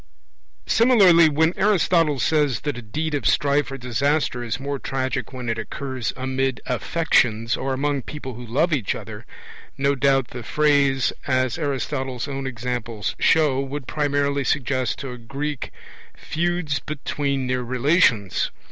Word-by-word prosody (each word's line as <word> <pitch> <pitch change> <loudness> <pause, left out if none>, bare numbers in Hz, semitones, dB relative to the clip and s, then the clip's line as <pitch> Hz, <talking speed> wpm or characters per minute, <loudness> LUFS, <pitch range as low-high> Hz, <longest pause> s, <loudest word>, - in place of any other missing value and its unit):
Similarly, 195 -9 +6
when 160 +3 +2
Aristotle 175 -6 +2
says 145 -1 +1
that 145 -3 -2
a 120 - -6
deed 150 +8 -3
of 145 - 0
strife 145 0 +2
or 135 - -5
disaster 125 +1 0
is 120 +3 -3
more 140 0 -3
tragic 130 -1 -3
when 125 -2 -7
it 115 0 -1
occurs 130 -1 -4
'amid 130 -1 -1
affections' 120 -5 +1
or 135 +1 -3
'among 140 +1 0
people 135 -1 -7
who 120 +2 -9
love 145 +9 +1
each 125 -9 0
other', - - -9 0.5
no 140 +1 +2
doubt 135 -2 +2
the 125 - -7
phrase, 140 0 +2
as 130 +2 +1
Aristotle's 135 -3 -2
own 135 -1 -4
examples 120 -4 -4
show, 150 -5 +3
would 135 0 -4
primarily 140 -1 0
suggest 130 -4 0
to 135 -3 -6
a 125 - -8
Greek 140 +4 -4 0.5
feuds 170 -2 -1
between 140 -2 -2
near 125 0 -1
relations. 125 - +2
135 Hz, 145 wpm, -23 LUFS, 125-150 Hz, 0.5 s, Similarly